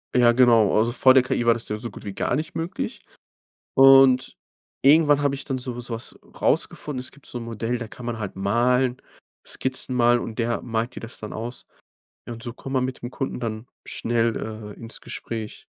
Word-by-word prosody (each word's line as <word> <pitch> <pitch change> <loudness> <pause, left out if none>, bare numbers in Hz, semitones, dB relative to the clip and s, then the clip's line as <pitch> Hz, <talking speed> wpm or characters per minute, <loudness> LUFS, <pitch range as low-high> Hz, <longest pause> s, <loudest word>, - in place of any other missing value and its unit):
Ja, 120 -1 +6
genau. 120 -5 +5
Also 115 +2 +3
vor 130 +1 +6
der 130 -1 +6
KI 120 -2 -1
war 115 - +6
das 115 -1 -7
ja 105 - -3
so 115 0 -6
gut 100 - -12
wie 100 - -5
gar 125 - 0
nicht 155 +4 -4
möglich. 165 +2 -4 0.7
Und 135 -1 +6 0.4
irgendwann 145 0 +5
habe 140 -1 +1
ich 135 - -6
dann 135 -3 -2
so 125 -1 -5
so 120 -1 -5
was 115 - -5 0.2
rausgefunden. 145 -4 0
Es 130 - -7
gibt 140 - -20
so - - -6
'n - - -6
Modell, 115 +1 -3
da 115 -1 -6
kann 120 +2 -11
man 120 -2 -3
halt 105 -3 -5
malen, 120 +6 +1 0.4
Skizzen 130 -1 -2
malen, 120 0 +4
und 115 0 -7
der 120 0 0
malt 115 +1 -2
dir - - -7
das 115 - -8
dann 105 - -7
aus. 120 +3 -6 0.6
Ja, 120 - -5
und 115 0 -9
so 120 - -4
kommt 135 +2 -8
man 130 -1 +2
mit 130 0 -6
dem 120 - -5
Kunden 135 0 -4
dann 115 -1 -4 0.2
schnell, 115 -1 0 0.4
äh, - - -16
ins 115 +1 -6
Gespräch. 110 -2 -6
120 Hz, 215 wpm, -24 LUFS, 115-130 Hz, 0.7 s, Ja